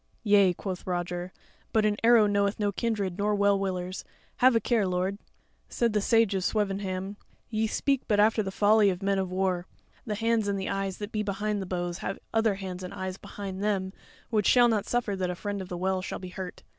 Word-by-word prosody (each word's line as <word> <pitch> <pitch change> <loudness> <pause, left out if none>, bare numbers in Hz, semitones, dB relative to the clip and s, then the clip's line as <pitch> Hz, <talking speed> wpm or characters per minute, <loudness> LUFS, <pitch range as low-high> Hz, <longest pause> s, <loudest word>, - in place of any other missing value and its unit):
"Yea," 205 -3 +5
quoth 185 +1 -6
Roger, 175 0 -3 0.4
"but 220 -1 +3
an 210 -1 +2
arrow 230 -2 +6
knoweth 200 0 +1
no 205 -1 +1
kindred 200 -4 -2
nor 210 +1 +2
well 200 -1 +3
willers: 185 -1 -3 0.3
have 255 -1 +5
a - - +5
care, 225 -4 +1
lord." 185 +2 -1 0.5
Said 235 -2 0
the 210 - +2
Sage 225 -1 +3
of 190 -1 -1
Swevenham: 195 -1 -2 0.3
"Ye 220 0 +1
speak 275 +4 0
but 205 -1 +2
after 215 +1 +4
the 195 - -3
folly 205 +1 +4
of 185 0 -3
men 195 0 +1
of 190 -1 -2
war; 185 -1 0 0.4
the 210 - -1
hands 225 0 +1
and 200 -1 0
the 190 - -3
eyes 195 -1 -2
that 205 +1 -6
be 215 - -1
behind 205 0 -2
the 190 - -5
bows 175 0 -3
have 195 - -4 0.2
other 225 -2 +2
hands 185 -2 -6
and 180 - -7
eyes 190 0 -4
behind 195 -2 -7
them 195 -2 0 0.4
which 210 -3 +2
shall 245 -1 +6
not 220 -4 0
suffer 240 -4 0
that 185 -1 -2
a 180 - -2
Friend 205 +2 -4
of 185 - -8
the 175 - -4
Well 185 +1 0
shall - - -5
be 185 - -8
hurt." 185 0 -7
200 Hz, 220 wpm, -28 LUFS, 185-215 Hz, 0.5 s, arrow